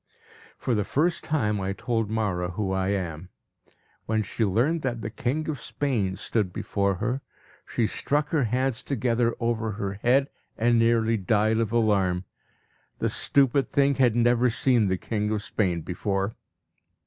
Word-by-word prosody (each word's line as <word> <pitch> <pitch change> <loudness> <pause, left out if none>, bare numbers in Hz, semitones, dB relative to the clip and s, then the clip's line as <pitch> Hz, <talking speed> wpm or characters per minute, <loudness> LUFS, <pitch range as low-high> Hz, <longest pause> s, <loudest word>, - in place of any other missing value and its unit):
For 125 - -1
the 105 -2 +1
first 165 - 0
time 105 -10 0
I 95 +1 -2
told 115 +1 -1
Mawra 95 -5 -1
who 95 +1 -2
I 95 0 0
am. 90 -3 -3 0.8
When 110 0 +1
she 115 - -2
learned 120 - +1
that 120 -4 -2
the 110 - -4
king 130 +7 -2
of 150 -5 -3
Spain 115 -9 -1
stood 100 0 -1
before 100 +1 -1
her, 125 +8 -2 0.5
she 115 - 0
struck 145 +6 0
her 150 -6 +1
hands 125 +1 0
together 120 -2 0
over 115 -2 -1
her 100 -1 -4
head, 135 +3 +3 0.3
and 120 +1 +3
nearly 115 0 +3
died 110 +3 +2
of 115 -2 0
alarm. 100 -6 +2 0.7
The - - 0
stupid 140 0 +2
thing 140 0 +3
had 125 -4 +3
never 120 +1 +3
seen 120 -2 +2
the 95 0 0
king 105 +2 -2
of 105 -1 -1
Spain 90 -7 -1
before! 95 +4 -2
110 Hz, 160 wpm, -26 LUFS, 100-125 Hz, 0.8 s, head